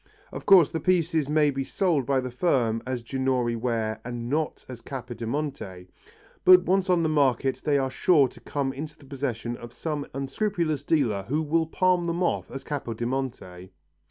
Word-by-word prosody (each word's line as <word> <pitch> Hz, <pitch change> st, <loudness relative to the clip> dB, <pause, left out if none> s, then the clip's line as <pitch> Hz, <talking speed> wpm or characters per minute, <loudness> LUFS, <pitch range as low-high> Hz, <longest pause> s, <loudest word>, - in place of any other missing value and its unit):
Of -, -, -8 dB
course 185 Hz, -7 st, +7 dB
the 160 Hz, -, -2 dB
pieces 165 Hz, -3 st, +1 dB
may 150 Hz, -1 st, +3 dB
be 135 Hz, 0 st, -2 dB
sold 155 Hz, -4 st, 0 dB
by 135 Hz, -2 st, +2 dB
the 130 Hz, 0 st, -5 dB
firm 120 Hz, -6 st, +1 dB
as 125 Hz, -2 st, -3 dB
Ginori 130 Hz, -2 st, 0 dB
ware 110 Hz, -2 st, -2 dB
and 120 Hz, 0 st, -5 dB
not 155 Hz, +1 st, -2 dB
as 125 Hz, -3 st, -9 dB
Capodimonte, 120 Hz, -6 st, -5 dB, 0.5 s
but 180 Hz, 0 st, +8 dB
once 190 Hz, +1 st, +1 dB
on 175 Hz, -2 st, +3 dB
the -, -, +2 dB
market 135 Hz, -4 st, +1 dB
they 145 Hz, -2 st, +2 dB
are 135 Hz, -1 st, 0 dB
sure 145 Hz, 0 st, +4 dB
to -, -, -16 dB
come 140 Hz, -2 st, -3 dB
into 150 Hz, +3 st, -7 dB
the 145 Hz, -, -17 dB
possession 125 Hz, -4 st, -4 dB
of 120 Hz, 0 st, -10 dB
some 150 Hz, -1 st, -4 dB
unscrupulous 155 Hz, +1 st, -1 dB
dealer 135 Hz, -11 st, +1 dB
who 150 Hz, +6 st, 0 dB
will 160 Hz, +1 st, +1 dB
palm 180 Hz, +1 st, +2 dB
them 170 Hz, +1 st, -1 dB
off 175 Hz, -, -1 dB
as 135 Hz, 0 st, -7 dB
Capodimonte. 120 Hz, -8 st, -4 dB
140 Hz, 175 wpm, -26 LUFS, 120-160 Hz, 0.5 s, but